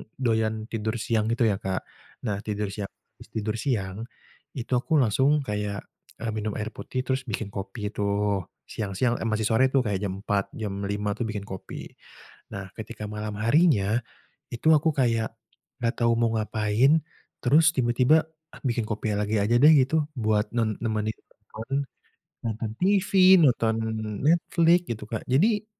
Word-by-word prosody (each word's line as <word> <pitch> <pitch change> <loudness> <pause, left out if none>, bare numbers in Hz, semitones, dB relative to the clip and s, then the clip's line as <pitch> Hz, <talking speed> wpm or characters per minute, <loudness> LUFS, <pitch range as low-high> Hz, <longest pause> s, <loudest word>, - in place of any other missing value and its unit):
doyan 110 -3 0
tidur 110 +1 -2
siang 110 -1 0
gitu 120 0 +1
ya, 105 -3 +2
Kak. 95 -2 -3 0.4
Nah, 100 -4 -2
tidur 105 -2 -3
sia 100 -1 -4 0.3
abis - - -13
tidur 110 0 -1
siang 110 -3 -2 0.5
itu 125 0 -6
aku 160 +5 -1
langsung 135 +6 +2
kayak, 105 -3 -3 0.4
eee, 115 - -1
minum 110 -1 -3
air 105 +1 -3
putih 130 -1 -4
terus 130 0 -2
bikin 110 -2 -4
kopi 100 +1 -5
tuh 100 -2 -1 0.2
siang-siang 110 +4 -1
eh 115 - -2
masih 110 0 0
sore 125 +3 +4
tuh 130 -1 +2
kayak 100 -4 -1
jam 100 -2 -2
4.00, 100 -2 0
jam 100 -3 -4
5.00 105 0 -1
tuh 115 +2 -3
bikin 105 -2 -4
kopi. 95 -2 -8 0.6
Nah, 95 0 -7
ketika 110 0 -7
malam 105 0 -5
harinya, 115 - +3 0.5
itu 120 +6 -3
aku 155 +2 +2
kayak 115 -4 +1 0.4
enggak 115 -1 0
tahu 115 0 +4
mau 115 -1 +2
ngapain 110 +4 +2 0.5
terus 155 +5 +5
tiba-tiba 125 +5 +3 0.4
bikin 120 -2 +1
kopi 105 0 -2
lagi 105 +1 0
aja 115 +4 +2
deh 150 - +9
gitu, 145 +3 +2
buat 105 -2 +1
ne 115 - +3 0.2
nemeni 110 -1 0
nonton, 115 +6 -6 0.6
nonton 110 -1 -3
TV, 195 +1 +2 0.3
nonton 115 -4 +3 0.5
Netflix 170 +1 +4
gitu, 110 -2 -4
Kak. 110 - -4
Jadi 205 - +2
110 Hz, 155 wpm, -26 LUFS, 105-130 Hz, 0.6 s, deh